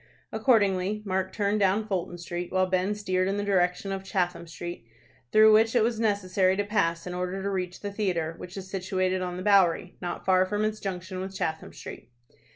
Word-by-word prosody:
Accordingly 205 Hz, -4 st, +2 dB
Mark 190 Hz, -1 st, -1 dB
turned 205 Hz, 0 st, 0 dB
down 200 Hz, +2 st, +2 dB
Fulton 180 Hz, -4 st, -3 dB
Street, 175 Hz, 0 st, -5 dB
while 185 Hz, 0 st, +3 dB
Ben 185 Hz, +2 st, 0 dB
steered 185 Hz, -3 st, 0 dB
in 195 Hz, +1 st, -1 dB
the 205 Hz, -, -1 dB
direction 190 Hz, -1 st, +1 dB
of 195 Hz, 0 st, -3 dB
Chatham 175 Hz, -3 st, -2 dB
Street, 175 Hz, -5 st, -7 dB, 0.4 s
through 215 Hz, 0 st, +7 dB
which 225 Hz, +2 st, +4 dB
it 235 Hz, -, +5 dB
was 230 Hz, -1 st, 0 dB
necessary 190 Hz, -3 st, +2 dB
to 205 Hz, -, +1 dB
pass 170 Hz, -5 st, 0 dB
in 180 Hz, -, -5 dB
order 180 Hz, +1 st, -3 dB
to 200 Hz, -, -1 dB
reach 180 Hz, -2 st, -3 dB
the 205 Hz, -, -4 dB
theatre, 180 Hz, -6 st, -1 dB
which 180 Hz, +2 st, -9 dB
is 190 Hz, -1 st, -6 dB
situated 185 Hz, -1 st, -1 dB
on 180 Hz, -1 st, -3 dB
the 185 Hz, -, -5 dB
Bowery, 185 Hz, -3 st, +3 dB
not 175 Hz, -1 st, -5 dB
far 185 Hz, -1 st, +5 dB
from 210 Hz, +2 st, 0 dB
its 215 Hz, 0 st, -2 dB
junction 185 Hz, -1 st, -5 dB
with 190 Hz, +1 st, -6 dB
Chatham 160 Hz, -3 st, -3 dB
Street. -, -, -10 dB
190 Hz, 200 wpm, -27 LUFS, 180-205 Hz, 0.4 s, through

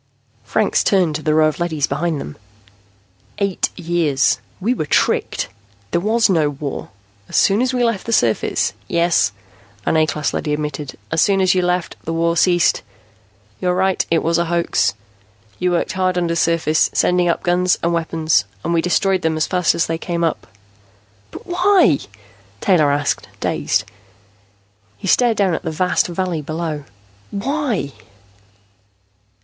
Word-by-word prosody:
Franks -, -, +1 dB
turned 185 Hz, -6 st, +2 dB
to 155 Hz, -, -3 dB
the 155 Hz, 0 st, +1 dB
row 155 Hz, 0 st, +5 dB
of 155 Hz, -, -3 dB
leadys 160 Hz, -5 st, 0 dB
behind 165 Hz, -2 st, -2 dB
them. 75 Hz, -, -7 dB, 1.0 s
"Eight 200 Hz, -2 st, 0 dB
years. 165 Hz, -5 st, +1 dB, 0.2 s
We 220 Hz, +6 st, +1 dB
were 155 Hz, -11 st, -3 dB
tricked. -, -, +1 dB, 0.4 s
There 170 Hz, -, +1 dB
was 225 Hz, +4 st, +3 dB
no 160 Hz, -7 st, +2 dB
war. 145 Hz, 0 st, -6 dB, 0.4 s
As -, -, -6 dB
soon 200 Hz, +3 st, +4 dB
as 255 Hz, 0 st, +1 dB
we 250 Hz, -1 st, 0 dB
left 230 Hz, -4 st, -1 dB
the -, -, -2 dB
surface 120 Hz, -, +1 dB
" -, -, -32 dB
"Yes," 170 Hz, -10 st, +2 dB, 0.5 s
an -, -, +2 dB
A 155 Hz, 0 st, +3 dB
class 150 Hz, -2 st, -2 dB
leady 150 Hz, -, -2 dB
admitted. 150 Hz, -2 st, -4 dB
"As 160 Hz, -, +2 dB
soon 195 Hz, -1 st, +3 dB
as 185 Hz, -1 st, +3 dB
you 185 Hz, -, +2 dB
left, 180 Hz, 0 st, -1 dB
the 165 Hz, -, -3 dB
war 170 Hz, +1 st, +1 dB
ceased. 175 Hz, 0 st, +3 dB, 0.8 s
You're 180 Hz, -1 st, 0 dB
right, 190 Hz, 0 st, +1 dB
it 165 Hz, -1 st, +2 dB
was 165 Hz, +1 st, +1 dB
a 170 Hz, -, +1 dB
hoax. 170 Hz, -, +1 dB, 0.6 s
You 180 Hz, -, +1 dB
worked 175 Hz, -1 st, 0 dB
hard 185 Hz, 0 st, 0 dB
undersurface, 165 Hz, -2 st, +1 dB
sending 180 Hz, -1 st, +2 dB
up 170 Hz, -, -1 dB
guns 180 Hz, +1 st, +2 dB
and 170 Hz, +1 st, +1 dB
weapons, 160 Hz, -, +1 dB, 0.2 s
and 170 Hz, -, -1 dB
we 165 Hz, -, +2 dB
destroyed 185 Hz, +2 st, +1 dB
them 160 Hz, -1 st, 0 dB
as 155 Hz, -, +1 dB
fast 180 Hz, -2 st, +1 dB
as 165 Hz, -, +1 dB
they 165 Hz, 0 st, -3 dB
came 170 Hz, -1 st, -2 dB
up." 165 Hz, -, -1 dB, 0.8 s
"But -, -, -11 dB
why?" 355 Hz, -, +3 dB, 0.6 s
Taylor 160 Hz, -, +3 dB
asked, 145 Hz, 0 st, -1 dB
dazed. -, -, 0 dB, 1.1 s
He -, -, -9 dB
stared 235 Hz, +2 st, +3 dB
down 195 Hz, -3 st, +2 dB
at -, -, -2 dB
the 165 Hz, -, -4 dB
vast 180 Hz, +4 st, +1 dB
valley 175 Hz, -2 st, -2 dB
below. 155 Hz, -1 st, -4 dB, 0.4 s
"Why?" 220 Hz, -, -2 dB
170 Hz, 160 wpm, -19 LUFS, 155-185 Hz, 1.1 s, row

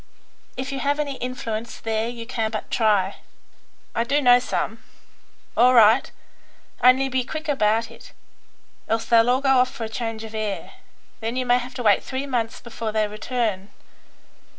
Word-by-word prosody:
If 260 Hz, +1 st, -4 dB
you 275 Hz, -, -3 dB
have 285 Hz, +2 st, 0 dB
any 285 Hz, -3 st, -2 dB
influence 235 Hz, -3 st, -5 dB
there 225 Hz, 0 st, -1 dB
you 235 Hz, -1 st, -7 dB
can 225 Hz, -2 st, -2 dB
but 215 Hz, -1 st, -6 dB
try." 205 Hz, -4 st, +2 dB, 0.8 s
"I 230 Hz, -, +1 dB
do 280 Hz, +5 st, +1 dB
know 245 Hz, -3 st, +6 dB
some." 225 Hz, -2 st, -3 dB, 0.7 s
"All 250 Hz, +2 st, +5 dB
right; 225 Hz, +2 st, +6 dB, 0.7 s
only 255 Hz, +2 st, +6 dB
be 260 Hz, -1 st, 0 dB
quick 310 Hz, +5 st, -6 dB
about 230 Hz, -5 st, +1 dB
it. -, -, -14 dB, 0.8 s
Else 225 Hz, 0 st, 0 dB
they'll 230 Hz, 0 st, +4 dB
all 255 Hz, +2 st, +2 dB
go 270 Hz, -2 st, +4 dB
off 255 Hz, 0 st, +3 dB
for 240 Hz, -, -7 dB
a 220 Hz, -, -4 dB
change 225 Hz, 0 st, -4 dB
of 220 Hz, 0 st, -9 dB
air; 215 Hz, -2 st, -4 dB, 0.5 s
then 225 Hz, +2 st, -3 dB
you 255 Hz, 0 st, -1 dB
may 245 Hz, 0 st, +4 dB
have 250 Hz, +1 st, -8 dB
to 250 Hz, -, -4 dB
wait 205 Hz, -3 st, +4 dB
three 265 Hz, +1 st, -4 dB
months 240 Hz, -4 st, -2 dB
before 230 Hz, -2 st, -5 dB
they 215 Hz, 0 st, +1 dB
return. 215 Hz, -2 st, -3 dB
235 Hz, 175 wpm, -23 LUFS, 220-255 Hz, 0.8 s, know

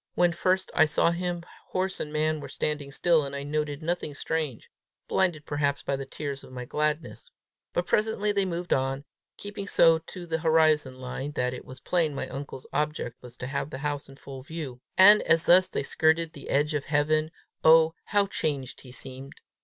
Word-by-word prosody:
When 175 Hz, -1 st, +4 dB
first 185 Hz, +2 st, 0 dB
I 155 Hz, -, +5 dB
saw 170 Hz, -, +2 dB
him, 175 Hz, 0 st, -3 dB, 0.2 s
horse 190 Hz, +1 st, -2 dB
and 150 Hz, -, -4 dB
man 155 Hz, 0 st, 0 dB
were 145 Hz, -, -8 dB
standing 150 Hz, -2 st, -2 dB
still, 165 Hz, +2 st, +3 dB
and 140 Hz, 0 st, -5 dB
I 140 Hz, -, -4 dB
noted 145 Hz, 0 st, -2 dB
nothing 165 Hz, -3 st, -2 dB
strange, 155 Hz, -6 st, -3 dB, 0.4 s
blinded 170 Hz, -6 st, +1 dB
perhaps 145 Hz, -1 st, -1 dB
by 140 Hz, -, -1 dB
the 135 Hz, 0 st, -6 dB
tears 140 Hz, 0 st, -5 dB
of -, -, -13 dB
my 125 Hz, -1 st, -6 dB
gladness. 150 Hz, -, -2 dB, 0.4 s
But -, -, -1 dB
presently 210 Hz, -1 st, +1 dB
they 200 Hz, -1 st, +1 dB
moved 175 Hz, -1 st, -1 dB
on, 135 Hz, +1 st, -1 dB, 0.3 s
keeping 200 Hz, -1 st, -6 dB
so 165 Hz, -4 st, +5 dB
to 175 Hz, +2 st, -9 dB
the 165 Hz, -1 st, -2 dB
horizon 155 Hz, -4 st, +3 dB
line 130 Hz, +3 st, -5 dB
that 125 Hz, -2 st, -1 dB
it 125 Hz, -, -8 dB
was 130 Hz, -1 st, -11 dB
plain 165 Hz, -5 st, +1 dB
my 130 Hz, -, -3 dB
uncle's 135 Hz, -1 st, -7 dB
object 150 Hz, -4 st, -2 dB
was 125 Hz, -1 st, -12 dB
to -, -, -5 dB
have 135 Hz, +2 st, -3 dB
the 130 Hz, -, -6 dB
house 145 Hz, 0 st, -3 dB
full 135 Hz, -1 st, -9 dB
in -, -, -12 dB
view; 150 Hz, -7 st, -6 dB, 0.2 s
and 205 Hz, +3 st, +9 dB
as 165 Hz, 0 st, +3 dB
thus 185 Hz, +1 st, +6 dB
they 185 Hz, -, -3 dB
skirted 160 Hz, +3 st, +2 dB
the 140 Hz, -, -10 dB
edge 150 Hz, +3 st, +2 dB
of 145 Hz, -2 st, -2 dB
heaven, 155 Hz, +1 st, +1 dB, 0.3 s
oh, 160 Hz, 0 st, +6 dB
how 205 Hz, -1 st, +2 dB
changed 140 Hz, -9 st, -3 dB
he 125 Hz, -, -12 dB
seemed! 130 Hz, +2 st, -7 dB
150 Hz, 195 wpm, -27 LUFS, 140-170 Hz, 0.4 s, and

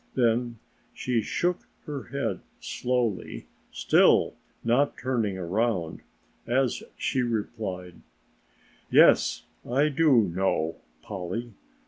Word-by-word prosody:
Then 120 Hz, -1 st, +1 dB, 0.4 s
she 125 Hz, -3 st, 0 dB
shook 175 Hz, +10 st, -1 dB, 0.2 s
her 145 Hz, -4 st, -5 dB
head 115 Hz, -9 st, -3 dB, 0.2 s
slowly, 120 Hz, -5 st, -2 dB, 0.3 s
still -, -, +4 dB, 0.3 s
not 125 Hz, +5 st, +2 dB
turning 115 Hz, -7 st, -1 dB
around, 95 Hz, -1 st, -1 dB, 0.5 s
as 125 Hz, +1 st, +1 dB, 0.2 s
she 130 Hz, -, 0 dB
replied: 105 Hz, -6 st, -3 dB, 0.9 s
"Yes, -, -, +5 dB, 0.2 s
I 140 Hz, +5 st, +2 dB
do 145 Hz, -4 st, +4 dB
know, 85 Hz, -3 st, -1 dB, 0.3 s
Polly. 105 Hz, +4 st, -5 dB
115 Hz, 90 wpm, -27 LUFS, 95-130 Hz, 0.9 s, Yes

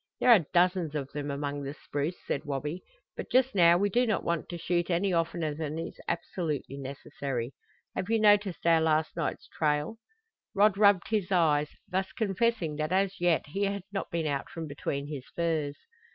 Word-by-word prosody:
"There 250 Hz, -, +5 dB
are 185 Hz, -10 st, +6 dB
dozens 175 Hz, -3 st, +2 dB
of 140 Hz, -2 st, -3 dB
them 145 Hz, 0 st, -4 dB
among 145 Hz, 0 st, -3 dB
the 140 Hz, +1 st, -5 dB
spruce," 145 Hz, +5 st, -3 dB
said 140 Hz, -, -2 dB
Wabi, 150 Hz, +5 st, -3 dB, 0.3 s
"but -, -, -6 dB
just 260 Hz, 0 st, +3 dB
now 170 Hz, -2 st, +6 dB
we 200 Hz, +3 st, +2 dB
do 245 Hz, +5 st, +2 dB
not 215 Hz, -, 0 dB
want 170 Hz, -2 st, -2 dB
to 175 Hz, -, -5 dB
shoot 175 Hz, +1 st, -1 dB
any 180 Hz, +2 st, +1 dB
oftener 165 Hz, -2 st, 0 dB
than 155 Hz, 0 st, -4 dB
is 165 Hz, +1 st, -6 dB
absolutely 160 Hz, -5 st, -3 dB
necessary. 135 Hz, -2 st, -4 dB, 0.4 s
Have 190 Hz, -, -3 dB
you 225 Hz, 0 st, +3 dB
noticed 205 Hz, -4 st, +3 dB
our 165 Hz, -1 st, +5 dB
last 160 Hz, 0 st, +1 dB
night's 165 Hz, -3 st, -3 dB
trail?" 150 Hz, +6 st, -1 dB, 0.6 s
Rod 205 Hz, 0 st, +5 dB
rubbed 200 Hz, -3 st, +4 dB
his 210 Hz, -4 st, 0 dB
eyes, 150 Hz, -5 st, +3 dB, 0.2 s
thus 190 Hz, +1 st, -1 dB
confessing 200 Hz, -6 st, 0 dB
that 155 Hz, +1 st, -2 dB
as 195 Hz, +1 st, +1 dB
yet 175 Hz, -2 st, +3 dB
he 200 Hz, +6 st, 0 dB
had 200 Hz, -1 st, -2 dB
not 195 Hz, -, -3 dB
been 170 Hz, -1 st, -2 dB
out 140 Hz, -2 st, -2 dB
from 165 Hz, -1 st, -6 dB
between 140 Hz, -1 st, -4 dB
his 145 Hz, -3 st, -6 dB
furs. 160 Hz, -4 st, -1 dB
170 Hz, 185 wpm, -29 LUFS, 150-195 Hz, 0.6 s, are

